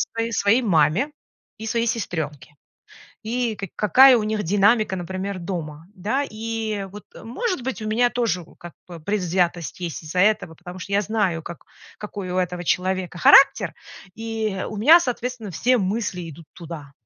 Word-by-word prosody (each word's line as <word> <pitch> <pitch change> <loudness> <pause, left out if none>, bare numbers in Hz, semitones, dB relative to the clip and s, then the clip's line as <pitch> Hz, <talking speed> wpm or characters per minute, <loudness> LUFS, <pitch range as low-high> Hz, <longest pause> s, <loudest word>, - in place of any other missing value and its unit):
своей 230 0 -2
своей 220 +4 +3
маме 175 - +2 0.5
и 220 - -7
своей 230 +1 0
сестренке, 160 - -4 0.7
и 235 0 -1
каки 195 -3 -7
какая 255 +6 +7
у 215 - -1
них 215 0 -1
динамика, 205 +3 +3
например, 190 +2 -4
дома, 165 -3 -6
да. 220 +9 -1
И 220 -2 -4
вот, 210 +1 -10
э, - - -11
может 365 - -3
быть, 260 -2 -4
у 215 - -4
меня 240 +3 +2
тоже, 230 -8 -1
вот, - - -20
как 175 -1 -11
бы 170 -2 -9
предвзятость 175 -2 -1
есть 170 -3 -5
из-за 160 +3 -3
этого, 205 -4 +2
потому 180 +2 -10
что 200 - -8
я 200 - +3
знаю, 200 -6 -1
как 170 0 -9 0.3
какой 200 -3 -7
у 185 - -2
этого 180 -1 -2
человека 185 0 -1
характер, 270 - +6 0.4
и 220 -3 -3
у 215 - -6
меня, 310 +11 +7
соответственно, 250 - -4
все 245 +10 +2
мысли 190 -4 -2
идут 160 +2 -12
туда. 160 -4 -9
200 Hz, 170 wpm, -23 LUFS, 175-225 Hz, 0.7 s, какая